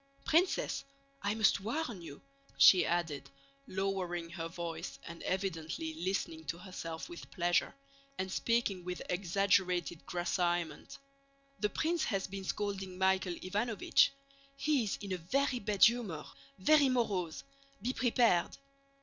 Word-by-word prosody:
"Princess, 345 +4 +2 0.4
I 205 +1 0
must 215 -3 +4
warn 230 - -3
you," 145 -4 -10 0.3
she 185 - +8
added, 170 -4 -1 0.4
lowering 185 -3 -2
her 165 -1 -4
voice 165 -1 -5
and 170 0 -9
evidently 165 -4 -2
listening 165 -1 -2
to 165 - -3
herself 170 -3 -6
with 170 - -10
pleasure, 175 0 +1 0.4
and 190 0 -3
speaking 220 -5 0
with 180 0 -4
exaggerated 180 -2 +1
grasseyement, 175 -2 -1 0.6
"the 210 - +1
prince 320 +6 0
has 195 -4 -1
been 195 0 -6
scolding 195 -2 -3
Michael 190 -1 +2
Ivánovich. 210 +8 +2 0.5
He 290 -6 +2
is 200 - -2
in 200 -2 -6
a - - -1
very 255 +9 0
bad 205 -3 +1
humor, 215 -10 +4 0.3
very 300 -2 +5
morose. 200 -10 0 0.4
Be 245 +6 -1
prepared." 235 -9 +2
190 Hz, 125 wpm, -33 LUFS, 175-215 Hz, 0.6 s, she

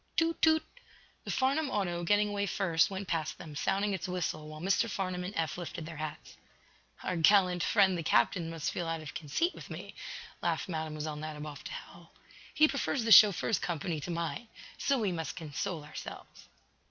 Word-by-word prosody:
"Toot! 330 0 +1
toot!" 315 0 +5 0.6
The - - -6
Farnum 275 +3 +1
auto, 175 -7 -1
getting 205 +3 +3
away 200 0 -1
first, 170 -3 +2
went 195 0 -5
past 160 -3 -2
them, 155 -3 -9
sounding 200 +7 +1
its 185 -2 -3
whistle 170 -4 -2
while 155 0 -8
Mr. 195 +6 +2
Farnum 185 -3 -2
and 185 +3 -5
Eph 165 +1 -1
lifted 170 -2 -6
their 160 -1 -8
hats. 155 0 -6 0.7
"Our 180 - -1
gallant 180 0 +5
friend, 195 -2 +4
the 170 - -2
captain, 160 +4 +2
must 165 -2 -2
feel 175 - -3
out 165 -1 -2
of 150 -3 -8
conceit 170 - 0
with - - -11
me," - - -7 0.5
laughed - - 0
Mlle. 160 -3 -2
Nadiboff 150 -1 -5
to - - -6
Hal. - - -10 0.4
"He 310 0 +5
prefers 275 -2 -1
the 225 - 0
chauffeur's 205 0 +7
company 165 -1 -2
to 175 - -6
mine. 170 +7 -3 0.3
So 275 - +2
we 210 -6 0
must 165 -2 -4
console 160 +2 -4
ourselves." 150 +1 -9
175 Hz, 180 wpm, -31 LUFS, 160-205 Hz, 0.7 s, chauffeur's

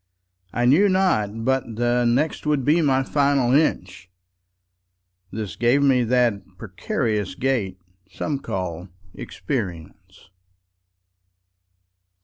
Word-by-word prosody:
I 120 - -1
knew 165 +11 +4
not 115 - 0
but 130 0 +1
the 120 +1 +1
nextWould 145 +2 0
be 160 +4 +3
my 135 -3 +2
final 140 -3 +1
inch,—This 90 - -5
gave 120 +4 +2
me 130 -3 +3
that 120 -4 +1 0.2
precarious 105 - -3
gaitSome 95 - -4
call 90 -1 -5 0.2
experience. 95 - -7
120 Hz, 85 wpm, -22 LUFS, 95-135 Hz, 0.2 s, knew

